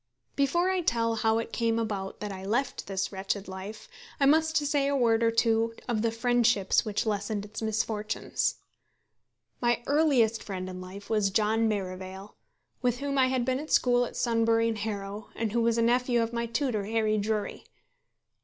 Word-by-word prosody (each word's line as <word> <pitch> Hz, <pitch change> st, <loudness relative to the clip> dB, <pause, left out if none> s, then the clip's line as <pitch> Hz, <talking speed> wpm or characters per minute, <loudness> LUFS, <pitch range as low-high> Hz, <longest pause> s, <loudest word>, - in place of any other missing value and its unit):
Before 345 Hz, +7 st, +2 dB
I 375 Hz, -1 st, 0 dB
tell 230 Hz, -7 st, +1 dB
how 220 Hz, 0 st, +2 dB
it 230 Hz, 0 st, -4 dB
came 230 Hz, -1 st, +1 dB
about 205 Hz, -4 st, -3 dB
that 210 Hz, -1 st, -4 dB
I 190 Hz, -1 st, -7 dB
left 235 Hz, +7 st, -1 dB
this 195 Hz, 0 st, -2 dB
wretched 195 Hz, +1 st, -3 dB
life, 190 Hz, +3 st, -8 dB, 0.3 s
I 275 Hz, -, +4 dB
must 315 Hz, +3 st, +4 dB
say 290 Hz, -1 st, +1 dB
a 280 Hz, -, +1 dB
word 230 Hz, -3 st, +3 dB
or 230 Hz, -, +4 dB
two 230 Hz, 0 st, +2 dB
of 230 Hz, -3 st, 0 dB
the 230 Hz, -, +2 dB
friendships 230 Hz, -3 st, +2 dB
which 210 Hz, 0 st, -2 dB
lessened 205 Hz, -1 st, -2 dB
its 215 Hz, +2 st, -8 dB
misfortunes. 220 Hz, -1 st, -1 dB, 1.1 s
My 240 Hz, 0 st, +1 dB
earliest 270 Hz, -7 st, +3 dB
friend 185 Hz, -2 st, -5 dB
in 185 Hz, 0 st, -7 dB
life 195 Hz, +2 st, -9 dB
was 210 Hz, -3 st, +2 dB
John 220 Hz, +3 st, +2 dB
Merivale, 190 Hz, -1 st, -5 dB, 0.5 s
with 245 Hz, -1 st, +1 dB
whom 280 Hz, +1 st, -1 dB
I 260 Hz, -, +5 dB
had 255 Hz, -2 st, 0 dB
been 260 Hz, +1 st, 0 dB
at 305 Hz, +2 st, -7 dB
school 245 Hz, -1 st, +3 dB
at -, -, -9 dB
Sunbury 230 Hz, -1 st, +2 dB
and 225 Hz, -2 st, -2 dB
Harrow, 205 Hz, -1 st, -5 dB
and 225 Hz, -2 st, -2 dB
who 235 Hz, +2 st, +1 dB
was 230 Hz, 0 st, +2 dB
a 230 Hz, -, +3 dB
nephew 245 Hz, +1 st, +2 dB
of 230 Hz, +1 st, -4 dB
my 235 Hz, 0 st, -1 dB
tutor, 230 Hz, -4 st, -1 dB
Harry 215 Hz, 0 st, +1 dB
Drury. 210 Hz, 0 st, -2 dB
225 Hz, 180 wpm, -28 LUFS, 205-245 Hz, 1.1 s, I